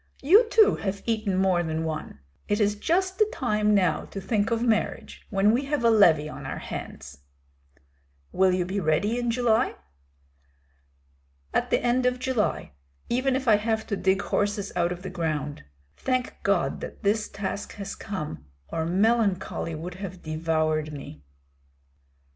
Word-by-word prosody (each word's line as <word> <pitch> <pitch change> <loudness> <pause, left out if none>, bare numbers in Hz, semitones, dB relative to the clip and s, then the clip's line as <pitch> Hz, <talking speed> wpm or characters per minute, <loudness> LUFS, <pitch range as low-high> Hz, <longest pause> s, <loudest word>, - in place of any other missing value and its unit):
You 415 - +6
too 440 -1 +5
have 200 0 -4
eaten 215 -4 0
more 190 -2 +3
than 160 -1 -2
one. 155 - -5 0.3
It 205 +1 +1
is 205 -1 +3
just 370 - 0
the 430 0 +4
time 210 - +1
now 180 -5 +2
to 195 - -7
think 205 +2 0
of 230 0 0
marriage 225 -3 -1
when 200 0 +3
we 255 +5 +1
have 285 -3 -1
a 230 - +5
levy 165 -9 +5
on - - -8
our - - -5
hands!" 70 0 -8 1.1
"Will 190 0 +3
you 180 -1 0
be 190 +3 -2
ready 200 +8 +1
in 240 -1 -1
July?" 230 -1 +2 1.8
"At - - +1
the - - +1
end 250 +1 +2
of 250 0 +1
July, 250 - -1 0.4
even 255 +2 +1
if 260 -1 -2
I 215 -2 +6
have 220 +1 -1
to 205 - -2
dig 190 +1 +1
horses 205 -1 -1
out 175 -1 +1
of 180 +1 -6
the 190 - -5
ground. 155 - -3 0.3
Thank 255 -1 -1
God - - 0
that - - -8
this 210 +1 +1
task 200 0 -5
has 200 -1 -6
come, 150 - -6 0.2
or 160 0 -2
melancholy 200 -3 +1
would 165 +3 -6
have 185 -2 -7
devoured 155 -1 0
me." 135 - -9
200 Hz, 160 wpm, -26 LUFS, 170-235 Hz, 1.8 s, You